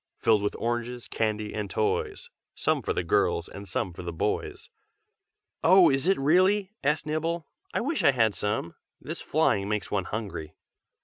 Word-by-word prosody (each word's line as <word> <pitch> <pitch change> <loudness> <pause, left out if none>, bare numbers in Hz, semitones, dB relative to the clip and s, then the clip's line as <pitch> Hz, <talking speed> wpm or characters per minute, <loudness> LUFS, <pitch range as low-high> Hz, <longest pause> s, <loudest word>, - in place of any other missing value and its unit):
Filled 110 -3 +3
with 105 - -1
oranges, 120 +1 -3
candy, 110 -1 -2
and 105 -2 -3
toys, 110 - -1 0.2
Some - - +1
for - - -2
the - - -1
girls 85 0 +1
and 100 -1 -9
some 90 0 -2
for 90 - -8
the 85 -1 -4
boys." 80 - -3 0.9
"Oh! 185 0 +7
is 135 +4 +1
it 195 - +4
really?" 185 +7 +3
asked 150 +2 +1
Nibble. 160 +2 -2 0.3
"I - - -1
wish 290 +6 -1
I - - +7
had 115 -5 +3
some! 105 -2 -2 0.3
this - - -6
flying 100 +1 +1
makes 105 -1 -2
one 100 -3 0
hungry." 100 -8 -5
115 Hz, 170 wpm, -27 LUFS, 100-155 Hz, 0.9 s, Oh